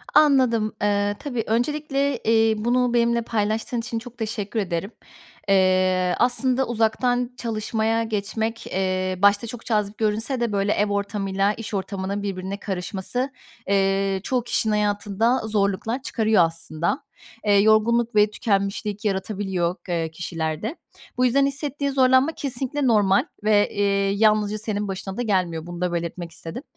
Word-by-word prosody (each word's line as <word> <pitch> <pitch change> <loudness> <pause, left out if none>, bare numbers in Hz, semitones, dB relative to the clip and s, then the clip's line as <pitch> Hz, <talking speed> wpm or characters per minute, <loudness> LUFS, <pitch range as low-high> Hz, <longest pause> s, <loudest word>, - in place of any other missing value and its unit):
Anladım. 255 -7 +4
Eee, 205 0 +1
tabii 250 -6 -3
öncelikle, 275 +3 0
eee, 225 -1 +3
bunu 245 +2 +1
benimle 235 0 +2
paylaştığın 225 +2 -1
için 230 0 -3
çok 245 +1 -12
teşekkür 220 -1 -3
ederim. 190 0 -2 0.6
Eee, 185 -1 +3
aslında 255 +1 +2
uzaktan 240 +2 +1
çalışmaya 225 0 -1
geçmek, 220 +1 -3
eee, 185 -1 -1
başta 205 +3 +4
çok 235 0 -8
cazip 210 -2 -1
görünse 225 +4 0
de, 235 -2 0
böyle, 200 0 +1
ev 210 0 +1
ortamıyla 200 0 0
iş 225 0 -8
ortamının 195 0 -3
birbirine 195 0 -4
karışması, 195 +7 -3 0.4
eee, 195 0 +1
çoğu 250 +2 0
kişinin 230 -2 0
hayatında 210 +3 +1
zorluklar 210 +4 0
çıkarıyor 220 -7 +2
aslında. 165 0 -2 0.4
Eee, 205 - +4
yorgunluk 225 +3 +3
ve 210 0 +5
tükenmişlik 205 0 -1
yaratabiliyor, 190 -3 -1
eee, 165 -2 -1
kişilerde. 165 - -4 0.4
Bu 250 - +3
yüzden 275 +3 +3
hissettiğin 280 0 -2
zorlanma 260 +2 +4
kesinlikle 275 -1 -1
normal 205 -4 +3 0.2
ve, 210 -1 +3
eee, 200 -1 +1
yalnızca 215 0 +3
senin 210 -1 -2
başına 195 0 -5
da - - -1
gelmiyor. 180 -7 0
Bunu 175 0 -7
da 180 -1 0
belirtmek 170 0 -4
istedim. 165 - -6
210 Hz, 135 wpm, -23 LUFS, 195-235 Hz, 0.6 s, ve